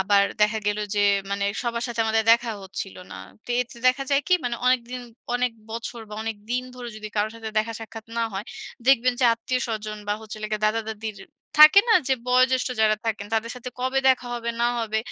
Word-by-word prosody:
আবার 200 Hz, +1 st, +4 dB, 0.2 s
দেখা 215 Hz, +1 st, +3 dB
গেল 210 Hz, 0 st, +1 dB, 0.2 s
যে 205 Hz, -, +2 dB, 0.3 s
মানে 200 Hz, 0 st, -1 dB, 0.2 s
সবার 235 Hz, -1 st, -2 dB
সাথে 235 Hz, -2 st, -3 dB
আমাদের 220 Hz, 0 st, +2 dB
দেখাও 230 Hz, -2 st, +1 dB
হচ্ছিল 190 Hz, 0 st, -6 dB, 0.2 s
না। -, -, -7 dB, 0.3 s
তো -, -, -19 dB
এতে 250 Hz, 0 st, -5 dB
দেখা 255 Hz, +2 st, +3 dB
যায় 280 Hz, 0 st, +4 dB
কি 365 Hz, -, +6 dB
মানে 240 Hz, -1 st, -1 dB
অনেক 255 Hz, 0 st, +4 dB
দিন, 250 Hz, 0 st, -4 dB, 0.3 s
অনেক 245 Hz, -1 st, +1 dB, 0.2 s
বছর 230 Hz, +1 st, -5 dB
বা, 210 Hz, -, -8 dB
অনেক 225 Hz, -1 st, -3 dB
দিন 250 Hz, +1 st, 0 dB
ধরে 245 Hz, -1 st, -7 dB
যদি 215 Hz, 0 st, -7 dB
কারো 210 Hz, +1 st, +2 dB
সাথে 225 Hz, -1 st, -6 dB
দেখা 225 Hz, +1 st, -1 dB
সাক্ষাৎ 225 Hz, 0 st, -9 dB
না 230 Hz, -, +1 dB
হয়, 195 Hz, +2 st, -4 dB, 0.4 s
দেখবেন 255 Hz, -2 st, +5 dB
যে -, -, +4 dB
আত্মীয়-স্বজন 225 Hz, -3 st, -3 dB
বা, -, -, +2 dB
হচ্ছে 220 Hz, -1 st, -8 dB
হলো 215 Hz, -, -4 dB
গিয়ে 215 Hz, 0 st, -2 dB
দাদা-দাদীর 220 Hz, -1 st, -3 dB, 0.4 s
থাকে 305 Hz, +6 st, +10 dB
না? 450 Hz, -, +6 dB
যে 265 Hz, -, +4 dB
বয়োজ্যেষ্ঠ 255 Hz, +1 st, +3 dB
যারা 215 Hz, -1 st, +4 dB
থাকেন 210 Hz, -2 st, -2 dB
তাদের 225 Hz, +1 st, 0 dB
সাথে 250 Hz, 0 st, -7 dB
কবে 260 Hz, +1 st, +1 dB
দেখা 255 Hz, -1 st, +3 dB
হবে 235 Hz, -1 st, -3 dB
না 235 Hz, -, +4 dB
হবে, 220 Hz, -1 st, -1 dB
230 Hz, 210 wpm, -24 LUFS, 215-250 Hz, 0.4 s, থাকে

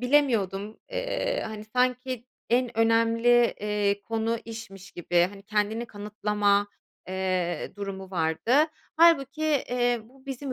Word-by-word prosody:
bilemiyordum, 225 Hz, -7 st, +1 dB
eee, -, -, -1 dB
hani, 215 Hz, -1 st, -7 dB
sanki 250 Hz, +1 st, -1 dB, 0.2 s
en 240 Hz, -1 st, +1 dB
önemli, 230 Hz, +1 st, +4 dB
eee, 205 Hz, -1 st, 0 dB
konu 225 Hz, +1 st, -1 dB
işmiş 220 Hz, -4 st, -9 dB
gibi, 175 Hz, 0 st, +2 dB
hani, 200 Hz, -1 st, -12 dB
kendini 215 Hz, +3 st, -1 dB
kanıtlama, 205 Hz, -1 st, 0 dB, 0.4 s
eee, 185 Hz, -2 st, -1 dB
durumu 195 Hz, -2 st, -6 dB
vardı. 165 Hz, +5 st, 0 dB, 0.4 s
Hâlbuki, 310 Hz, -3 st, +4 dB
eee, 245 Hz, -5 st, +1 dB
bu 260 Hz, +4 st, -21 dB
bizim 270 Hz, 0 st, -4 dB
225 Hz, 115 wpm, -27 LUFS, 200-250 Hz, 0.4 s, önemli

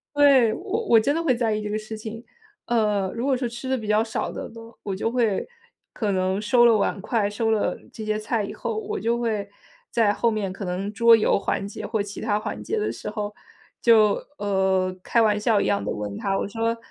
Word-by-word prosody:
对， 275 Hz, -6 st, +6 dB
我 420 Hz, +4 st, -3 dB
我 230 Hz, -, +6 dB
真 280 Hz, +6 st, +1 dB
的 330 Hz, -, 0 dB
会 285 Hz, -6 st, +2 dB
在 230 Hz, -3 st, 0 dB
意 210 Hz, -, -2 dB
这 210 Hz, -, -4 dB
个 215 Hz, -, -1 dB
事 215 Hz, +1 st, -7 dB
情。 220 Hz, +2 st, -8 dB, 0.4 s
呃， 210 Hz, -5 st, +1 dB
如 235 Hz, +2 st, -3 dB
果 270 Hz, -2 st, +2 dB
是 245 Hz, -1 st, -2 dB
吃 240 Hz, +2 st, -7 dB
的 265 Hz, -, +1 dB
比 220 Hz, -, -7 dB
较 210 Hz, +1 st, +4 dB
少 225 Hz, -1 st, -3 dB
的 -, -, -6 dB
呢， 230 Hz, -, -12 dB, 0.2 s
我 200 Hz, -, -3 dB
就 210 Hz, +4 st, -1 dB
会 230 Hz, -5 st, 0 dB, 0.5 s
可 215 Hz, -3 st, -2 dB
能 185 Hz, +1 st, 0 dB
收 240 Hz, +3 st, +4 dB
了 230 Hz, -2 st, +6 dB
碗 200 Hz, -1 st, 0 dB
筷， 210 Hz, 0 st, 0 dB
收 225 Hz, +2 st, -1 dB
了 210 Hz, -4 st, +1 dB, 0.2 s
这 220 Hz, -, -7 dB
些 215 Hz, 0 st, -1 dB
菜 215 Hz, 0 st, -1 dB
以 -, -, -5 dB
后 -, -, -4 dB
我 430 Hz, 0 st, -4 dB
就 235 Hz, +1 st, 0 dB
会， 215 Hz, -4 st, -2 dB, 0.4 s
在 220 Hz, -3 st, +3 dB
后 235 Hz, +2 st, +1 dB
面 205 Hz, -3 st, -2 dB
可 195 Hz, +1 st, -7 dB
能 190 Hz, +3 st, -3 dB
桌 230 Hz, +1 st, +6 dB
游 215 Hz, -, +2 dB
环 195 Hz, -, -2 dB
节 200 Hz, -, -6 dB
或 220 Hz, -1 st, -1 dB
其 200 Hz, 0 st, -8 dB
它 210 Hz, -2 st, 0 dB
环 215 Hz, -, -5 dB
节 445 Hz, -, -2 dB
的 425 Hz, -, -1 dB
时 -, -, -7 dB
候 210 Hz, 0 st, -4 dB, 0.5 s
就， 215 Hz, -3 st, +5 dB, 0.2 s
呃， 190 Hz, -2 st, +1 dB
开 230 Hz, -, +2 dB
玩 210 Hz, -2 st, +3 dB
笑 210 Hz, -1 st, +2 dB
一 -, -, 0 dB
样 100 Hz, -, +1 dB
的 -, -, -2 dB
问 105 Hz, -1 st, -5 dB
他， 195 Hz, -1 st, -1 dB
我 -, -, -1 dB
说： 230 Hz, +2 st, -1 dB
215 Hz, 250 characters per minute, -24 LUFS, 205-235 Hz, 0.5 s, 对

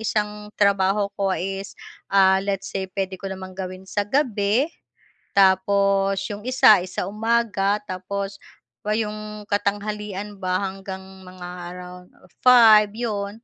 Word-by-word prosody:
isang 210 Hz, -1 st, -2 dB
trabaho 200 Hz, 0 st, +2 dB
ko, 200 Hz, -1 st, -1 dB
ah, -, -, -4 dB
is 195 Hz, +1 st, -5 dB, 0.6 s
let's 195 Hz, 0 st, -3 dB
say 190 Hz, -1 st, -3 dB
puwede 190 Hz, -1 st, -4 dB
ko 195 Hz, -, -5 dB
namang 190 Hz, -1 st, -7 dB
gawin 185 Hz, 0 st, -7 dB
sa 205 Hz, +1 st, -2 dB
gabi, 230 Hz, -3 st, +2 dB, 0.7 s
tapos 195 Hz, 0 st, +3 dB
yung 205 Hz, -, -8 dB
isa 240 Hz, -4 st, +5 dB
sa 180 Hz, -, -3 dB
umaga 210 Hz, -1 st, +1 dB
tapos 195 Hz, +1 st, -5 dB, 0.5 s
yung 215 Hz, -1 st, -3 dB
katanghalian 205 Hz, 0 st, -3 dB
ba 185 Hz, 0 st, -1 dB
hanggang 190 Hz, 0 st, -6 dB, 0.2 s
mga 180 Hz, -1 st, -9 dB, 0.3 s
around 180 Hz, 0 st, -10 dB, 0.3 s
5 225 Hz, -4 st, +7 dB
'yon. 215 Hz, -1 st, -4 dB
200 Hz, 120 wpm, -23 LUFS, 190-210 Hz, 0.7 s, 5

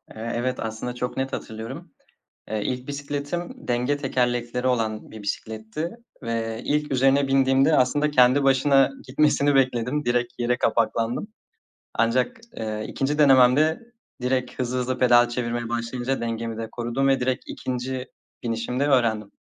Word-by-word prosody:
Eee, 115 Hz, +1 st, -4 dB
evet, 125 Hz, +2 st, -1 dB
aslında 110 Hz, +2 st, -4 dB
çok 125 Hz, 0 st, -4 dB
net 135 Hz, 0 st, -2 dB
hatırlıyorum. 110 Hz, +1 st, -7 dB, 0.6 s
Eee, 110 Hz, 0 st, -2 dB
ilk 125 Hz, 0 st, -3 dB
bisikletim 145 Hz, +4 st, -5 dB
denge 125 Hz, +4 st, +1 dB
tekerlekleri 125 Hz, -2 st, -1 dB
olan 110 Hz, -4 st, -1 dB
bir 110 Hz, -, -9 dB
bisikletti 110 Hz, +9 st, -4 dB, 0.3 s
ve 115 Hz, -1 st, -3 dB
ilk 150 Hz, 0 st, 0 dB
üzerine 135 Hz, +1 st, +3 dB
bindiğimde 135 Hz, +2 st, +4 dB
aslında 145 Hz, +4 st, +2 dB
kendi 130 Hz, 0 st, +5 dB
başına 135 Hz, 0 st, +4 dB, 0.2 s
gitmesini 145 Hz, +1 st, +2 dB
bekledim. 130 Hz, +2 st, +1 dB
Direkt 120 Hz, 0 st, 0 dB
yere 120 Hz, +1 st, +1 dB
kapaklandım. 115 Hz, -, 0 dB, 0.7 s
Ancak, 120 Hz, -, +1 dB, 0.2 s
eee, 110 Hz, -1 st, -3 dB
2'nci 145 Hz, +3 st, -1 dB
denememde 140 Hz, -, +5 dB, 0.4 s
direkt 125 Hz, 0 st, -1 dB
hızlı 125 Hz, 0 st, -1 dB
hızlı 125 Hz, 0 st, -2 dB
pedal 120 Hz, -1 st, +5 dB
çevirmeye 120 Hz, -1 st, -3 dB
başlayınca 120 Hz, +3 st, -2 dB
dengemi 115 Hz, -1 st, -3 dB
de 115 Hz, 0 st, -5 dB
korudum 120 Hz, +3 st, -1 dB
ve 135 Hz, -1 st, +3 dB
direkt 125 Hz, 0 st, -1 dB
2'nci 130 Hz, 0 st, -4 dB, 0.4 s
binişimde 120 Hz, +4 st, -1 dB
öğrendim. 115 Hz, -7 st, +2 dB
125 Hz, 135 wpm, -24 LUFS, 115-135 Hz, 0.7 s, kendi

